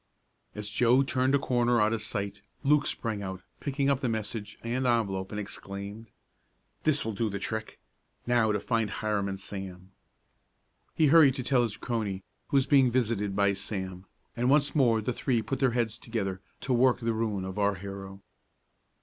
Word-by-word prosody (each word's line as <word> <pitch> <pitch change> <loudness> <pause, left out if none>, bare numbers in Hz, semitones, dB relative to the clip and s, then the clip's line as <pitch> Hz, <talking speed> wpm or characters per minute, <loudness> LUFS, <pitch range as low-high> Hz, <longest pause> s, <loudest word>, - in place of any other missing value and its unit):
As 105 -1 -5
Joe 120 +5 +4
turned 130 0 +1
a - - +6
corner 120 -3 +2
out 105 +1 +3
of 115 - -1
sight, 100 -2 -4 0.2
Luke 150 +1 +4
sprang 110 -3 -2
out, 95 -1 -6 0.2
picked 140 0 -3
up 140 -2 +3
the 130 - -1
message 110 -1 -4
and 125 +2 -1
envelope, 100 -6 0
and 105 - -3
exclaimed: 100 +2 -7 0.8
"This 150 -4 +3
will 110 - -2
do 110 +2 -1
the 100 - -3
trick! 110 +2 -4 0.5
Now 120 -3 +3
to 105 - 0
find 115 0 0
Hiram 105 -1 -1
and 95 0 -4
Sam." 95 -1 -7 1.0
He 160 - +4
hurried 145 -6 +7
to 130 - -3
tell 130 0 +3
his 115 -3 -2
crony, 105 -6 -3 0.2
who 140 - +2
was 135 - +3
being 135 -3 +5
visited 110 -5 0
by 100 0 +3
Sam, 95 -2 -5 0.3
and 120 +2 +1
once 145 +1 +4
more 120 -7 +3
the 120 +4 -1
three 120 -2 0
put 135 - -3
their 130 -3 +2
heads 115 -1 0
together, 95 -5 -3 0.2
to 130 - 0
work 125 +1 +4
the 115 0 0
ruin 110 -4 -1
of 95 +2 -5
our 100 0 +2
hero. 95 0 -8
110 Hz, 185 wpm, -29 LUFS, 100-125 Hz, 1.0 s, hurried